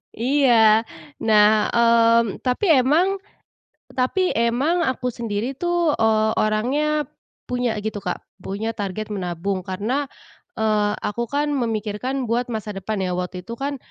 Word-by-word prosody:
Iya, 230 -3 +4 0.3
nah, 215 -1 +4
mmm, 230 -2 +3
tapi 250 +10 0
emang 340 +10 +2 0.8
tapi 255 +8 0
emang 240 +9 +1
aku 250 -1 -4
sendiri 230 +2 -3
tuh, 345 +1 +1
eee, 220 -1 +2
orangnya 280 +8 +1 0.4
punya 245 -2 -1
gitu, 210 0 -4
Kak, 180 - -3 0.2
punya 210 +4 -3
target 205 +1 -4
menabung 185 0 -3
karena, 220 +10 -2 0.5
eee, 215 -1 +2
aku 210 +3 -3
kan 290 +1 0
memikirkan 235 +2 -2
buat 235 +2 -1
masa 215 -2 -4
depan 195 +2 -4
ya 185 -1 -1
waktu 180 0 -4
itu 230 - -5
kan, 280 +4 -3
230 Hz, 130 wpm, -22 LUFS, 210-255 Hz, 0.8 s, Iya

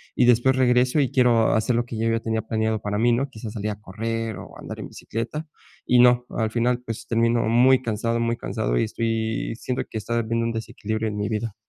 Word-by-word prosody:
y 125 - +4
después 125 +2 +4
regreso 125 +2 +3
y 135 - +1
quiero 120 -3 +4
hacer 110 +2 +1
lo 120 0 +1
que 115 -2 -6
yo 115 0 +1
ya 115 0 +1
tenía 110 -1 -1
planeado 110 0 -1
para 105 0 -2
mí, 120 +2 +3
¿no? 135 +4 0
Quizás, 110 -2 -8
salir 105 -1 -3
a 105 - -7
correr 115 +2 -4
o - - -11
andar - - -8
en - - -6
bicicleta 120 +8 -5 0.4
y 125 0 +4
no, 125 0 +5
al 110 -1 -1
final, 120 +1 +1
pues 115 -1 -6
termino 115 0 +2
muy 125 +3 +5
cansado, 115 +1 -1
muy 115 0 0
cansado - - -2
y - - +2
estoy 110 0 -2
siento 125 0 -3
que 110 - -5
está 120 +3 -2
habiendo 115 +1 -1
un 115 - 0
desequilibrio 110 0 -3
en 105 - -5
mi 105 +2 -2
vida. 110 -1 -3
115 Hz, 225 wpm, -24 LUFS, 110-120 Hz, 0.4 s, no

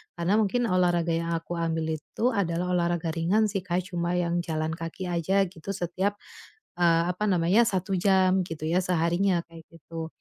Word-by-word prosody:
Karena 180 +5 +1
mungkin 230 +4 +1
olahraga 175 -4 +2
yang 165 0 -1
aku 170 +1 -4
ambil 160 -1 -1
itu 245 +10 -1
adalah 180 -3 -1
olahraga 170 -2 0
ringan 195 +6 +1
sih, 195 - -1
Kak, 180 +2 -2
cuma 175 0 -1
yang 175 0 0
jalan 160 -2 -2
kaki 165 +2 -5
aja 190 +4 +2
gitu 190 +3 -6
setiap, 190 +3 -1 0.6
eee, 165 -1 +4
apa 185 +4 -5
namanya, 185 +5 +3
1 190 0 -1
jam 190 -1 +3
gitu 160 -1 -7
ya 170 +3 +2
seharinya, 175 +1 +1
kayak 165 -1 -12
gitu. 165 0 -8
175 Hz, 170 wpm, -27 LUFS, 165-190 Hz, 0.6 s, eee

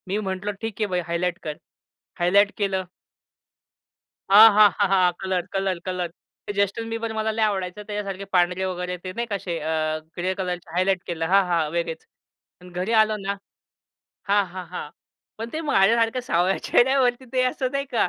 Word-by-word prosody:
मी 195 +2 -1
म्हंटलो 195 0 -3
ठीक 225 -1 -5
आहे 210 - +2
भाई, 180 -2 -1
हायलाइट 170 +1 -1
कर. 150 -1 -5 0.6
हायलाइट 200 +4 +4
केलं. 195 -2 -1 1.4
हां, 215 +3 +10
हां, 210 0 +7
हां, 205 - +4
हां. 185 -2 +4
Colour, 185 -2 -1
colour, 195 -2 -1
colour. 180 -2 -3 0.4
Justin 200 +3 0
Bieber 225 0 -3
मला 220 0 -1
लई 220 +1 -3
आवडायचा. 195 -1 -1
त्याच्यासारखे 200 -2 -4
पांढरे 180 +1 +2
वगैरे 180 -1 -3
ते 185 - -5
नाही 235 +3 -2
का 205 - -2
असे 175 -3 -4
अ, 155 0 -1 0.2
ग्रे 185 +2 0
कलरचे 180 -3 -4
हायलाइट 185 0 +1
केलं. 165 -2 -2
हां, 195 +2 +5
हां. 165 -3 +1
वेगळेच. 165 -1 -3 0.6
आणि 180 - -12
घरी 180 +4 -3
आलो 215 0 +1
ना. 200 +1 -1 0.9
हां, 200 0 +4
हां, 185 -1 -7
हां. 180 - -6 0.5
पण 225 +1 -4
ते 315 - -3
माझ्यासारख्या 230 +4 +3
सावळ्या 185 -4 +1
चेहऱ्यावरती 255 0 +3
ते 255 -1 +2
असं 255 0 -3
नाही 275 0 -1
का? 225 - +3
190 Hz, 175 wpm, -24 LUFS, 180-215 Hz, 1.4 s, हां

